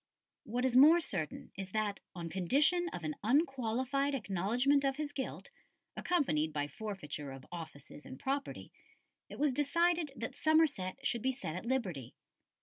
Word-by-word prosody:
] -, -, -59 dB
What 250 Hz, +1 st, +2 dB
is 255 Hz, -2 st, +1 dB
more 305 Hz, +6 st, +8 dB
certain 175 Hz, -, -3 dB
is 190 Hz, -1 st, -6 dB
that, 215 Hz, -2 st, 0 dB, 0.2 s
on 170 Hz, -2 st, -5 dB
condition 285 Hz, -, +2 dB
of 175 Hz, -, -7 dB
an 155 Hz, -1 st, -2 dB
unqualified 270 Hz, +1 st, +1 dB
acknowledgment 245 Hz, +6 st, +1 dB
of 270 Hz, -1 st, +1 dB
his 300 Hz, 0 st, -3 dB
guilt, 285 Hz, -, -5 dB, 0.4 s
accompanied 160 Hz, -, +1 dB
by 145 Hz, -1 st, -1 dB
forfeiture 150 Hz, -5 st, -6 dB
of 135 Hz, -1 st, -10 dB
offices 155 Hz, -4 st, -9 dB
and 130 Hz, -, -10 dB
property, 275 Hz, +1 st, -3 dB, 0.6 s
it -, -, -9 dB
was 290 Hz, -2 st, +2 dB
decided 325 Hz, +3 st, +2 dB
that 265 Hz, -, -5 dB
Somerset 285 Hz, -, +2 dB
should 235 Hz, -, 0 dB
be 265 Hz, -, +1 dB
set 245 Hz, -, -5 dB
at 185 Hz, +6 st, -6 dB
liberty. 190 Hz, -, -2 dB
250 Hz, 155 wpm, -33 LUFS, 180-285 Hz, 0.6 s, more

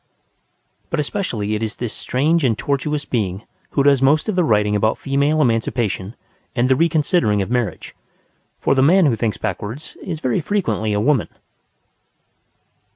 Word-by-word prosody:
But 170 Hz, -, -2 dB
especially 125 Hz, -, -2 dB
it 105 Hz, -, -2 dB
is 110 Hz, 0 st, -3 dB
this 120 Hz, -3 st, -4 dB
strange 155 Hz, +6 st, 0 dB
and 115 Hz, -5 st, +2 dB
tortuous 145 Hz, +3 st, -2 dB
being 100 Hz, -4 st, -2 dB, 0.3 s
who 140 Hz, -, +4 dB
does 140 Hz, -2 st, +4 dB
most 145 Hz, +4 st, +3 dB
of 215 Hz, -, -1 dB
the 180 Hz, -, +3 dB
writing 105 Hz, -5 st, +2 dB
about 110 Hz, +2 st, +1 dB
female 140 Hz, +3 st, +1 dB
emancipation 115 Hz, -4 st, -1 dB, 0.4 s
and 120 Hz, 0 st, +2 dB
the 130 Hz, -, +5 dB
reconsidering 150 Hz, -, +2 dB
of 95 Hz, -, -7 dB
marriage. 120 Hz, -5 st, -2 dB, 0.6 s
For -, -, +2 dB
the 135 Hz, -, +2 dB
man 175 Hz, +6 st, +5 dB
who 130 Hz, -6 st, +3 dB
thinks 110 Hz, -1 st, -2 dB
backwards 110 Hz, -, -5 dB
is 165 Hz, -4 st, -5 dB
very 130 Hz, 0 st, 0 dB
frequently 115 Hz, -, -1 dB
a 105 Hz, -, +1 dB
woman. 130 Hz, +1 st, +2 dB
125 Hz, 155 wpm, -20 LUFS, 110-150 Hz, 0.6 s, the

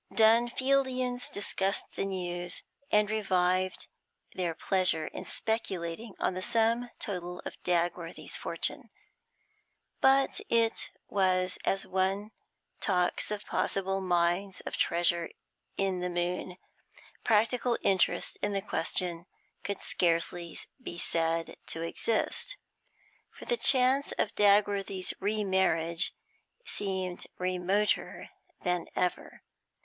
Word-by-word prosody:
Dunfieldians 250 Hz, +2 st, +3 dB
discussed 195 Hz, -1 st, +1 dB
the -, -, -1 dB
news, 175 Hz, -2 st, -4 dB, 0.3 s
and 210 Hz, 0 st, +4 dB
revived 185 Hz, -3 st, +1 dB, 0.5 s
their 175 Hz, -3 st, -2 dB
pleasure 180 Hz, -4 st, +2 dB
in -, -, -6 dB
speculating 200 Hz, -2 st, -3 dB
on -, -, 0 dB
the 185 Hz, -, -4 dB
sum 230 Hz, +4 st, +2 dB
total 180 Hz, -3 st, -4 dB
of -, -, -7 dB
Dagworthy's 175 Hz, -1 st, -1 dB
fortune. -, -, -2 dB, 1.1 s
But 270 Hz, 0 st, +4 dB
it 230 Hz, -1 st, +2 dB, 0.2 s
was 185 Hz, -2 st, +1 dB
as 195 Hz, 0 st, +1 dB
one 190 Hz, +3 st, 0 dB, 0.5 s
talks 180 Hz, -3 st, +1 dB
of 210 Hz, -1 st, -4 dB
possible 195 Hz, 0 st, -1 dB
mines 180 Hz, +1 st, +1 dB
of -, -, -5 dB
treasure 170 Hz, 0 st, +1 dB, 0.5 s
in 190 Hz, -2 st, 0 dB
the 180 Hz, 0 st, -2 dB
moon; 175 Hz, +1 st, -2 dB, 0.7 s
practical 235 Hz, +2 st, +2 dB
interest 190 Hz, -2 st, +1 dB
in 205 Hz, -, 0 dB
the 195 Hz, -, 0 dB
question 175 Hz, -2 st, -2 dB, 0.4 s
could 200 Hz, -1 st, -3 dB
scarcely 170 Hz, 0 st, 0 dB, 0.2 s
be 175 Hz, -8 st, -6 dB
said 165 Hz, -1 st, 0 dB
to 165 Hz, -, -1 dB
exist, 230 Hz, -, -1 dB, 0.7 s
for -, -, -12 dB
the 485 Hz, -, +1 dB
chance 270 Hz, -, +4 dB
of -, -, -1 dB
Dagworthy's 200 Hz, -2 st, +3 dB
remarriage 190 Hz, -5 st, +2 dB, 0.5 s
seemed 190 Hz, -3 st, -2 dB
remoter 185 Hz, +3 st, 0 dB, 0.3 s
than 180 Hz, -2 st, 0 dB
ever. 180 Hz, -, -2 dB
190 Hz, 105 wpm, -30 LUFS, 175-215 Hz, 1.1 s, and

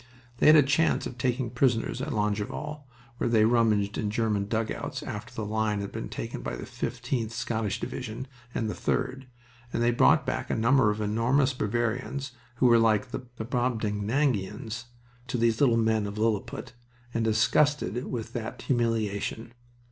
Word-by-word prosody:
They -, -, +3 dB
had 155 Hz, -, +9 dB
a 150 Hz, -, +8 dB
chance 145 Hz, +4 st, +2 dB
of 125 Hz, -, -7 dB
taking 125 Hz, -1 st, 0 dB
prisoners 125 Hz, -1 st, +1 dB
at 155 Hz, +3 st, -3 dB
Longueval, 110 Hz, +7 st, -2 dB, 0.3 s
where -, -, +1 dB
they 110 Hz, -2 st, +5 dB
rummaged 110 Hz, -3 st, +2 dB
in 105 Hz, -, -1 dB
German 105 Hz, -2 st, 0 dB
dugouts 110 Hz, +1 st, -2 dB
after 105 Hz, +4 st, -6 dB
the 110 Hz, -, -3 dB
line 105 Hz, 0 st, 0 dB
had 100 Hz, 0 st, -4 dB
been -, -, -5 dB
taken -, -, -5 dB
by -, -, -4 dB
the -, -, -7 dB
15th 125 Hz, -1 st, -3 dB
Scottish 115 Hz, -2 st, -2 dB
Division 125 Hz, -1 st, -5 dB, 0.3 s
and 115 Hz, -, 0 dB
the 105 Hz, -, -2 dB
3d, 135 Hz, 0 st, -2 dB, 0.5 s
and 115 Hz, -, 0 dB
they 120 Hz, -, +4 dB
brought 120 Hz, -, +4 dB
back -, -, -2 dB
a -, -, +1 dB
number 115 Hz, +1 st, +4 dB
of 105 Hz, +1 st, -1 dB
enormous 120 Hz, +6 st, +2 dB
Bavarians 120 Hz, +4 st, -2 dB, 0.2 s
who 130 Hz, -, +1 dB
were 120 Hz, -1 st, +7 dB
like 115 Hz, +2 st, +2 dB
the -, -, -3 dB
Brobdingnagians 120 Hz, -1 st, -1 dB, 0.4 s
to 125 Hz, -, -2 dB
these 115 Hz, 0 st, +2 dB
little 120 Hz, -5 st, +5 dB
men 110 Hz, -2 st, +2 dB
of 100 Hz, +1 st, -6 dB
Lilliput 110 Hz, 0 st, -1 dB, 0.4 s
and 115 Hz, -, 0 dB
disgusted 120 Hz, +2 st, +2 dB
with 115 Hz, -3 st, -5 dB
that 110 Hz, -2 st, -5 dB
humiliation. 115 Hz, -2 st, -1 dB
115 Hz, 165 wpm, -28 LUFS, 110-125 Hz, 0.5 s, had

